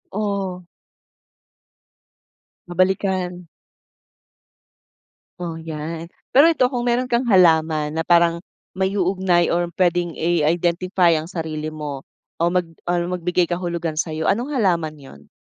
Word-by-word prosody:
Ooh. 195 -4 -2 2.0
Nabalikan. 185 0 0 1.9
O, 170 -2 -4
yan. 160 +1 -6 0.2
Pero 300 +5 +7
ito, 260 -6 +2
kung 250 -2 -3
meron 245 +1 +1
kang 240 0 +1
halaman 160 -7 +3
na 165 - 0
parang 170 0 +3 0.3
maiuugnay 190 -2 +1
or 175 0 0
pwedeng 175 -1 +2
i-identify 170 +2 +1
ang 160 +3 -4
sarili 155 -3 -4
mo 145 -3 -6 0.4
o 170 - +3
mag 180 -1 0 0.2
or 175 0 -1
magbigay 180 0 0
kahulugan 170 -2 -3
sa'yo, 160 0 -2
anong 240 +8 0
halaman 170 - 0
yun? 75 - -15
175 Hz, 110 wpm, -21 LUFS, 160-185 Hz, 2.0 s, Pero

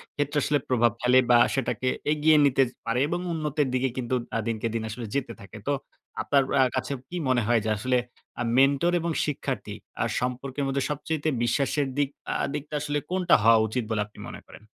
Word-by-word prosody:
ক্ষেত্রে 145 0 -1
আসলে 145 - +2
প্রভাব 120 -2 +3
ফেলে 125 +1 +5
বা 120 - +8 0.2
সেটাকে 135 -1 -1 0.3
এগিয়ে 155 +1 +4
নিতে 135 -1 +3 0.2
পারে 115 +2 0
এবং 175 +3 -2
উন্নতির 150 -2 -1
দিকে 130 +1 +1
কিন্তু 130 0 -1 0.2
আ - - +2
দিনকে 115 0 -1
দিন 115 -1 -2
আসলে 115 +2 -6
যেতে 140 -1 -2
থাকে। 100 +2 -11
তো 145 - +2 0.5
আপনার 140 -1 +3 0.2
আ - - +7
কাছে 130 +2 -2 0.2
কি 180 - -5
মনে 125 -2 +3
হয় 120 -1 +4
যে, - - 0
আসলে 125 +4 +1 0.4
আ - - +1
মেন্টর 140 +5 +4
এবং 170 +1 -1
শিক্ষার্থী 150 -2 -4 0.3
আ - - +1
সম্পর্কের 130 +3 -3
মধ্যে 135 0 0
সবচাইতে 150 +1 -2
বিশ্বাসের 135 +4 +1
দিক 145 -2 +2 0.3
আ - - +2
দিকটা 150 0 -6
আসলে 145 0 -1
কোনটা 180 -1 +4
হওয়া 115 0 +6
উচিত 120 +3 -2
বলে 105 - +1
আপনি 105 - -18
মনে - - -9
করেন? - - -14
135 Hz, 195 wpm, -26 LUFS, 120-145 Hz, 0.5 s, বা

